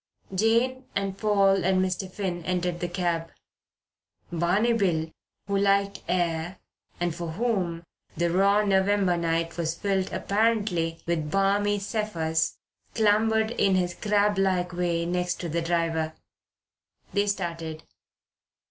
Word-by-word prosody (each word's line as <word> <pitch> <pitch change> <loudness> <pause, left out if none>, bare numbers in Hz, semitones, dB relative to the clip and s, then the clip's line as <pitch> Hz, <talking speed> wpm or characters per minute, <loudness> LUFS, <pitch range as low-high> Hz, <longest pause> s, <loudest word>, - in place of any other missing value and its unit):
Jane 230 +6 +2
and 195 -1 -1
Paul 195 -2 +3
and 185 +1 +3
Mr. 185 0 -1
Finn 180 -3 -3
entered 180 0 -1
the 175 - -2
cab. 175 -2 -1 1.0
Barney 180 +8 +2
Bill, 170 -7 0 0.3
who 200 0 0
liked 200 0 +2
air 170 0 -1 0.4
and 175 -1 0
for 170 -1 -5
whom 185 -6 -1 0.3
the 170 0 +1
raw 200 +3 +4
November 195 -2 +2
night 165 0 -1
was 165 -1 -1
filled 195 0 -1
apparently 205 -6 0
with 160 -3 -1
balmy 200 +3 +2
zephyrs, 195 -6 -1 0.4
clambered 220 +1 +3
in 195 -5 +2
his 180 -1 0
crablike 195 -3 +1
way 170 -1 0
next 180 0 -1
the 170 -1 -2
driver. 165 -1 0 1.0
They 200 +1 +2
started. 165 -5 -3
185 Hz, 120 wpm, -26 LUFS, 170-200 Hz, 1.0 s, raw